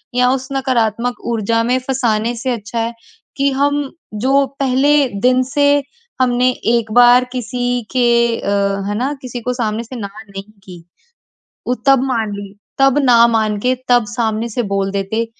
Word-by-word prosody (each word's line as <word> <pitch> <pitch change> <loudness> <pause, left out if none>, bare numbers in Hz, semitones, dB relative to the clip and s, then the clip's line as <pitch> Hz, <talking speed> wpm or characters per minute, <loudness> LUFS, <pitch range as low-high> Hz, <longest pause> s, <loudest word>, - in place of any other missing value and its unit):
या 250 0 +3
उस 260 0 -1
नकारात्मक 245 -3 -1
ऊर्जा 230 +1 0
में 245 +2 +1
फँसाने 240 -3 -1
से 250 +3 -4
अच्छा 230 0 -4
है 230 +1 -2 0.4
कि 280 0 +2
हम 285 +2 +1 0.4
जो 275 +1 +3
पहले 270 +1 +2 0.3
दिन 255 0 +3
से 285 0 +2 0.5
हमने 250 0 +2 0.2
एक 230 -2 0
बार 245 +1 +6
किसी 245 0 -2
के 255 -1 +1 0.4
अ, - - -4 0.4
है 205 - -2
ना 265 +4 -1
किसी 245 -1 -7
को 250 +2 -2
सामने 225 -2 -2
से 255 +3 -10
ना 200 -4 -5 0.2
नहीं 195 0 -7 0.2
की, 175 -3 -12 0.8
वो 250 - +1
तब 270 -2 +5
मान 225 -5 -1
ली, 200 -1 -9 0.2
तब 270 +1 +4
ना 235 -2 +6
मान 220 -2 0
के 255 +2 +1
तब 245 -2 +4
सामने 225 0 -2
से 240 +2 -2
बोल 195 0 0
देते, 200 +4 -2
245 Hz, 170 wpm, -17 LUFS, 220-255 Hz, 0.8 s, बार